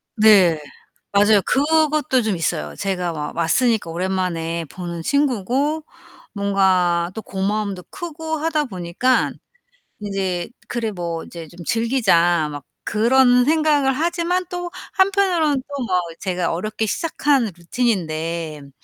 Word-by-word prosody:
네. 200 -7 +6 0.5
맞아요. 205 0 +5
그것도 300 -2 +2
좀 215 -4 0
있어요. 75 - -2
제가 180 -3 -2
막 150 0 -5
왔으니까 210 +4 +1
오랜만에 170 -2 -2
보는 170 +2 -6
친구고 280 - 0 0.5
뭔가 185 -4 +2
또 220 - -4
고마움도 195 -1 -2
크고 320 -2 -5
하다 305 -1 0
보니까 190 +5 0 0.7
인제 190 -3 -2 0.2
'그래 230 -3 -2
뭐 170 -3 -4
이제 165 -2 -9
좀 175 +3 -12
즐기자.' 180 - +2
막 145 -1 -8 0.2
그런 245 +3 +4
생각을 300 -3 +3
하지만 345 +4 0
또 355 -1 -5 0.2
한편으로는 375 -7 +2
또 280 -2 -3
뭐 185 -5 +1 0.2
제가 180 -2 -1
어렵게 215 +5 -2
시작한 290 -2 +1
루틴인데 165 -6 -2
막 140 - -14
210 Hz, 260 characters per minute, -21 LUFS, 175-280 Hz, 0.7 s, 네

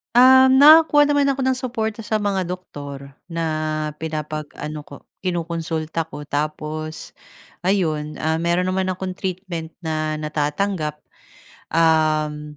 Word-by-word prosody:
Ah, 260 +1 +8
nakakuha 290 +2 +7
naman 285 -1 +3
ako 275 -1 0
ng 260 -1 +1
suporta 225 -4 -3
sa 215 -1 0
mga 195 -3 0
doktor 145 -6 -8
na, 155 -2 -2
pinapag-ano 155 -1 -5
ko 140 - -12 0.2
kinokonsulta 165 -2 -3
ko 150 - -9
tapos 155 +2 -4 0.6
ayun. 155 -6 0
Ah, 160 0 +1
meron 170 +2 +1
naman 185 0 0
akong 185 0 -3
treatment 180 -3 -5
na 155 -1 -2
natatanggap. 150 +1 -2 0.7
Uhm, 155 -2 +1
160 Hz, 115 wpm, -21 LUFS, 155-190 Hz, 0.7 s, Ah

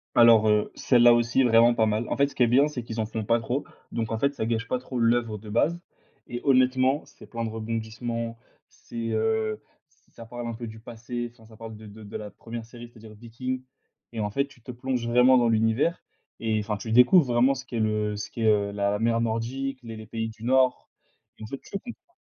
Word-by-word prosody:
Alors, 115 -2 +7
heu, 105 0 +2
celle-là 120 -2 +5
aussi 120 +2 +2
est - - +5
vraiment 120 0 +5
pas 110 -1 +2
mal. 110 +2 -1
En - - 0
fait, 140 0 +4
ce 140 - -13
qui 125 - +3
est - - +4
bien, 135 +5 +4
c'est 130 -6 -5
qu'ils 115 -1 -6
en 110 - +1
font 110 -1 -4
pas 115 +1 +3
trop. 125 +5 -2 0.3
Donc, 115 -1 -3
en 110 - -2
fait, 140 0 +1
ça 110 - -2
gâche 115 0 -1
pas 125 - 0
trop 125 0 -5
l'œuvre 115 -2 +1
de 105 0 -11
base. 160 +10 +1 0.5
Et 120 - -5
honnêtement, 130 +1 +3
c'est - - -16
plein 115 -1 -5
de 110 - -2
rebondissements. 115 +1 -4 0.3
C'est, 115 -1 -7
heu, 110 -1 0 0.5
ça 115 - -11
parle 120 0 -6
un 115 - -3
peu 115 +1 -7
du 110 0 -10
passé, 120 +1 -6
enfin 115 -2 -20
ça 110 -1 -16
parle 115 -1 -8
de 110 0 -12
de 105 +1 -12
de 100 - -6
la 105 -1 -7
première 115 +2 -8
série, 120 0 -11
c'est-à-dire 110 -2 -14
Vikings 125 +3 -5 0.5
et, 115 - -6
en 105 -1 -1
fait, 140 +6 0
tu 135 -4 -20
te 125 - -8
plonges 125 -1 -3
vraiment 125 +2 +5
dans 120 -1 +3
l'univers 115 +9 +1 0.4
et 110 -1 0
enfin, 105 0 -3
tu 110 +3 -6
découvres 125 +7 +6
vraiment 125 +3 +4
ce 135 +1 -8
qu'est 120 -3 -4
le 105 -1 0
ce 105 - -6
qu'est, 115 -1 -2
heu, 100 -1 +3
la 100 0 0
mer 115 0 +1
nordique, 130 +4 -2
les 115 -1 -7
les 110 0 -9
pays 110 0 -3
du 110 0 -13
Nord. 130 0 +2 0.5
Et - - -9
en - - -6
fait, 135 - -6
tu - - -17
comprends... 250 - -12
115 Hz, 235 wpm, -26 LUFS, 110-125 Hz, 0.5 s, Alors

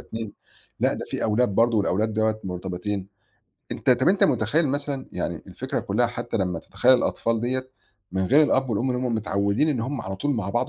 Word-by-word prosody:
2 110 -2 -6 0.5
لأ، - - +3
ده - - -5
فيه - - -2
أولاد 110 +2 +2
برضه 115 -1 +3
والأولاد 105 +2 +1
دوّة 110 0 0
مرتبطين. 95 +2 -4 0.7
أنت - - 0
طَب 125 +3 +4
أنت 195 +1 +4
متخيّل 155 -1 +2
مثلًا 140 -1 -3
يعني - - -3
الفكرة - - -4
كُلّها - - +1
حتّى - - -4
لمّا 90 -3 -1
تتخيّل 130 +9 +3
الأطفال 115 -2 0
ديّة 130 +2 -2 0.4
من 95 0 0
غير 145 +9 +6
الأب 135 -3 +2
والأم 120 +4 0
اللي 125 0 -1
هم 120 - 0
متعوِّدين 100 +5 +1
إن 130 -6 0
هم 130 +2 -3
على 95 0 -5
طول 145 +8 -1
مع 100 -4 -2
بعض 120 - 0
115 Hz, 195 wpm, -24 LUFS, 100-130 Hz, 0.7 s, غير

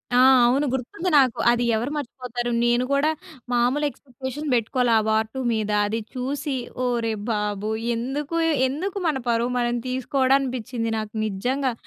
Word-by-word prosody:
ఆ! - - +5 0.3
అవును. 270 +4 +2
గుర్తుంది 265 +8 -2
నాకు. 260 -4 +3
అది 240 0 +1
ఎవరు 235 +6 -2
మర్చిపోతారు. 245 -3 -4
నేను 240 +1 +3
కూడా 280 +2 +3 0.4
మామూలు 250 +5 +2
ఎక్స్‌పెక్టేషన్స్ 265 +2 -7
పెట్టుకోలే 240 +1 +2
వార్ 220 0 +2
2. 265 - -4
మీద. 215 -1 -1 0.2
అది 220 +2 -1
చూసి 275 +2 -3 0.3
ఒరేయ్ 230 -3 0
బాబు! 210 -1 -2 0.3
ఎందుకు, 275 +7 -3 0.3
ఎందుకు 345 +10 -3
మన 305 -4 +1
పరువు 235 +1 +1
మనం 240 0 0
తీసుకోవడం 260 +1 +2
అనిపించింది 245 -3 -3
నాకు 215 -1 -5
నిజంగా. 250 +6 -1
250 Hz, 140 wpm, -24 LUFS, 230-275 Hz, 0.4 s, ఆ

